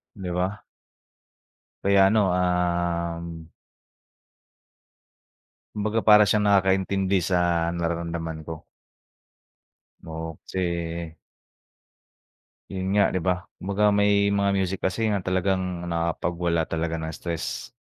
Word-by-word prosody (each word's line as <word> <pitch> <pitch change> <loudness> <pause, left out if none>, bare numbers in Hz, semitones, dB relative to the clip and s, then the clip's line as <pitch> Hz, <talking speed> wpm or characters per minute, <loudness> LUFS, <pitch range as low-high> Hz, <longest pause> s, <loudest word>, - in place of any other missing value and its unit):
'Di 95 -4 -5
ba? 90 +3 -2 1.2
Kaya 100 0 +5
ano, 110 +2 +3
um 85 -2 -1 2.3
kumbaga 110 +2 0
para 105 -1 +8
siyang 105 +1 +2
nakakaintindi 95 0 +2
sa 85 -1 +1
nararamdaman 85 -2 -3
ko. 80 -1 -7 1.4
Oo 80 0 -5 0.2
kasi 95 - -5 2.1
yun 95 +1 -1
nga 100 - +4
'di 95 - 0
ba, 90 0 -1 0.2
kumbaga 105 +2 +2
may 100 0 +3
mga 100 0 +2
music 95 0 -1
kasi 105 +4 -1
nga 100 - 0
talagang 95 -1 -1
nakakapagwala 85 0 -1
talaga 80 +1 -2
ng 80 0 -5
stress. 85 +1 -4
90 Hz, 100 wpm, -25 LUFS, 85-100 Hz, 2.3 s, para